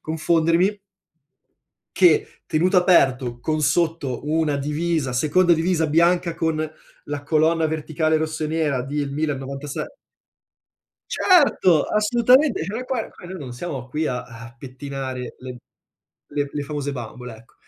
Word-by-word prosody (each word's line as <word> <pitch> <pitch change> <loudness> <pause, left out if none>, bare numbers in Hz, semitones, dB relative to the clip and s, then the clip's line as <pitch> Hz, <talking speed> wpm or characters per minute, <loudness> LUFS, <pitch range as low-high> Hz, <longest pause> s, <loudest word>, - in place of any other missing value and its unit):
confondermi 165 +5 +1 1.2
che - - +3
tenuto 180 +5 +1
aperto, 130 -9 +3
con 155 +2 -1
sotto 150 -4 0
una 155 -1 0
divisa 150 -1 -1
seconda 165 +7 +3
divisa 165 0 +1
bianca 170 +2 +2
con 160 -1 -1 0.5
la 145 -1 -5
colonna 160 +1 +2
verticale 155 0 0
rosso 155 0 -2
e - - 0
nera 150 -5 0
del 140 +1 -3
Milan 150 -2 -1
96 135 +1 -5 1.2
Certo! 275 - +4
Assolutamente! 240 - +3
Cioè 200 +5 -5
noi 250 +2 -4
qua 250 -3 -3
qua - - -16
noi 185 +1 -7
non 130 -4 -7
siamo 130 -3 -6
qui 155 +4 -2
a 125 0 -3
a 115 0 -12
pettinare 130 -1 -6
le 125 -1 -8 0.7
le 145 -1 -2
le 145 - -3
famose 145 -1 -4
bambole, 125 -1 -8
ecco. 115 +1 -19
155 Hz, 135 wpm, -22 LUFS, 135-170 Hz, 1.2 s, Certo